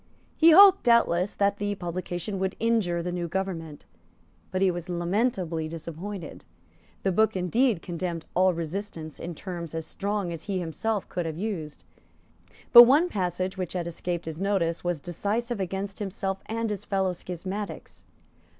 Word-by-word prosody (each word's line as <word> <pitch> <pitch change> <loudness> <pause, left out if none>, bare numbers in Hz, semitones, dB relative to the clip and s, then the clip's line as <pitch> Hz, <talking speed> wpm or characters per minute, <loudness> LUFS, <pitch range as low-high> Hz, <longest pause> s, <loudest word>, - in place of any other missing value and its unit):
He 330 - +6
hoped, 390 +3 +9
doubtless, 205 -6 +3
that 200 0 +1
the 205 0 -2
publication 180 +2 -4
would 190 0 -1
injure 210 -7 +1
the 180 - -3
new 175 -1 -2
government; 165 -4 -4 0.6
but 185 - -2
he 190 - +4
was 175 +1 -6
lamentably 175 -2 -1
disappointed. 165 +3 -7 0.6
The 195 - +2
book 220 +3 +2
indeed 190 +2 +1
condemned 170 -1 -4
all 185 +1 +4
resistance 165 -1 -5
in 170 0 -6
terms 170 -2 -6
as 160 -1 -3
strong 200 -2 -2
as 165 - -7
he 200 - -2
could 185 - 0
himself 190 +6 -2
have 165 -3 -2
used; 175 -7 -4 0.9
but 240 - +14
one 295 +8 +4
passage 185 - -2
which 180 -2 -3
had 180 -2 -2
escaped 170 0 -4
his 160 +2 -6
notice 185 -4 0
was 175 -3 -1
decisive 210 - -2
against 195 +1 -4
himself 195 -1 -3
and 225 0 -2
his 205 - -4
fellow 190 -2 0
schismatics. 185 +4 -6
185 Hz, 155 wpm, -27 LUFS, 170-205 Hz, 0.9 s, but